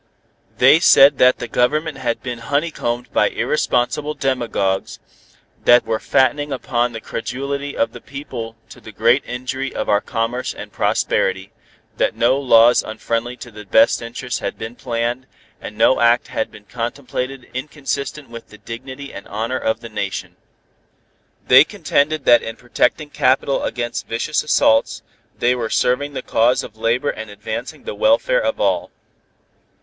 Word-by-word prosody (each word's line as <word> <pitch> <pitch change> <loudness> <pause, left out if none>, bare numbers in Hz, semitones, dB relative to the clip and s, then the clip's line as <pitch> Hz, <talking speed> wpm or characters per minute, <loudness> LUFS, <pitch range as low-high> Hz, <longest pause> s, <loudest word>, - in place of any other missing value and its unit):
They 135 +5 +6
said 140 -4 +6
that 125 0 +5
the 120 - -5
Government 150 +7 0
had 120 -2 -2
been 125 -2 -5
honeycombed 125 -3 -2
by - - +3
irresponsible 145 +5 -1
demagogues, 115 -8 -1 0.7
that 120 0 +6
were 110 -1 -1
fattening 145 +3 +1
upon 120 -2 -1
the 110 - -6
credulity 140 +6 -4
of 115 0 +1
the - - -10
people 125 -5 -7
to - - -13
the 110 - -11
great 115 +6 +3
injury 130 +2 -4
of - - -3
our 105 0 +3
commerce 120 +2 -3
and - - -9
prosperity, 95 +1 0 0.5
that - - +1
no 125 +4 +2
laws 120 -3 +5
unfriendly 115 +2 -3
to 120 - -9
the 105 0 -10
best 280 - +3
interests 120 +1 -5
had - - -4
been 110 +2 -7
planned, 120 +1 -3 0.3
and 105 - -8
no 130 - +4
act 120 +1 +3
had 140 - -2
been 105 - -15
contemplated 125 +2 -5
inconsistent 140 +1 -4
with 115 0 -11
the 105 - -14
dignity 130 +5 -9
and - - -9
honor 115 +5 -3
of 110 +1 -1
the 115 - -8 0.2
Nation. 100 - -6 1.1
They - - +8
contended 150 +1 0
that 120 -1 +6
in 115 - -6
protecting 145 +5 -1
capital 135 +1 +1
against 120 -1 -3
vicious 120 +7 -1
assaults, 110 -6 +2 0.3
they 120 +1 +2
were 120 -3 -3
serving 140 +6 0
the 130 - -5
cause 120 +3 +2
of 110 - -10
labor 115 +5 0
and 110 -1 -8
advancing 110 +8 -6
the - - -5
welfare - - +2
of - - -1
all. - - 0
125 Hz, 155 wpm, -19 LUFS, 115-135 Hz, 1.1 s, They